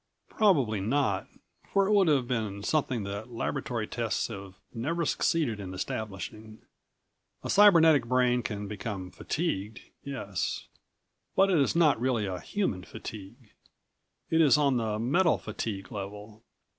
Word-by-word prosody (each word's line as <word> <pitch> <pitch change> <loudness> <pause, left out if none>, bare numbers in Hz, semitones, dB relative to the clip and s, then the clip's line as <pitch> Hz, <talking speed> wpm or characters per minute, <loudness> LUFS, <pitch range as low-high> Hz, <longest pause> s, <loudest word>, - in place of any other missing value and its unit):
Probably 140 - +2
not... 105 -2 0 0.4
for 195 0 +3
it 200 - 0
would 195 -3 +5
have 140 -5 +3
been 110 -5 -2
something 130 -4 0
that 100 +4 -5
laboratory 120 -1 -3
tests 115 -3 -2
have 95 -1 -8 0.2
never 160 +9 -1
succeeded 145 -9 +1
in 95 -2 -6
establishing. 110 +2 -6 0.8
A - - -2
cybernetic 165 - +6
brain 125 0 +3
can 105 -3 -4
become 100 -3 -5
fatigued, 110 - -3 0.2
yes 115 -9 -3 0.7
but 195 0 +4
it 175 - +4
is 140 - +2
not 155 -8 +4
really 120 -4 +1
a 95 -2 -4
human 110 - -2
fatigue. 95 0 -10 0.8
It 165 0 +4
is 150 -2 +6
on 140 -3 +3
the 110 -2 -1
metal 155 +10 +2
fatigue 105 -2 -5
level. 105 +2 -7
115 Hz, 135 wpm, -29 LUFS, 100-145 Hz, 0.8 s, cybernetic